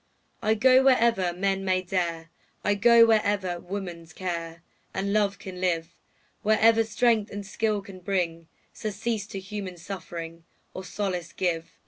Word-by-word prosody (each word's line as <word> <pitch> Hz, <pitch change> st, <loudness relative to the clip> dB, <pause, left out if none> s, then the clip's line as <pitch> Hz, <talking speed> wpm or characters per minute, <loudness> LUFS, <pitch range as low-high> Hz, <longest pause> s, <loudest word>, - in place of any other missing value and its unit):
I 220 Hz, 0 st, +2 dB
go 260 Hz, +4 st, +5 dB
wherever 230 Hz, -8 st, +4 dB
men 195 Hz, +2 st, -1 dB
may 185 Hz, -1 st, +1 dB
dare, 170 Hz, -3 st, -2 dB, 0.3 s
I 205 Hz, -, +3 dB
go 230 Hz, +3 st, +7 dB
wherever 205 Hz, -5 st, +1 dB
woman's 175 Hz, -3 st, -7 dB
care 170 Hz, -2 st, -5 dB, 0.3 s
And 200 Hz, +1 st, -1 dB
love 205 Hz, -2 st, +2 dB
can 185 Hz, -2 st, -8 dB
live, 170 Hz, -2 st, 0 dB, 0.5 s
Wherever 220 Hz, +1 st, +4 dB
strength 225 Hz, -1 st, +2 dB
and 205 Hz, 0 st, -6 dB
skill 210 Hz, 0 st, -1 dB
can 195 Hz, -2 st, -11 dB
bring 175 Hz, -3 st, -2 dB, 0.3 s
Surcease 215 Hz, 0 st, -3 dB
to 195 Hz, -, -6 dB
human 190 Hz, -2 st, -6 dB
suffering, 170 Hz, -2 st, -7 dB, 0.3 s
Or 185 Hz, -, -6 dB
solace 180 Hz, -2 st, -3 dB
give. 165 Hz, -3 st, -2 dB
195 Hz, 140 wpm, -26 LUFS, 175-210 Hz, 0.5 s, go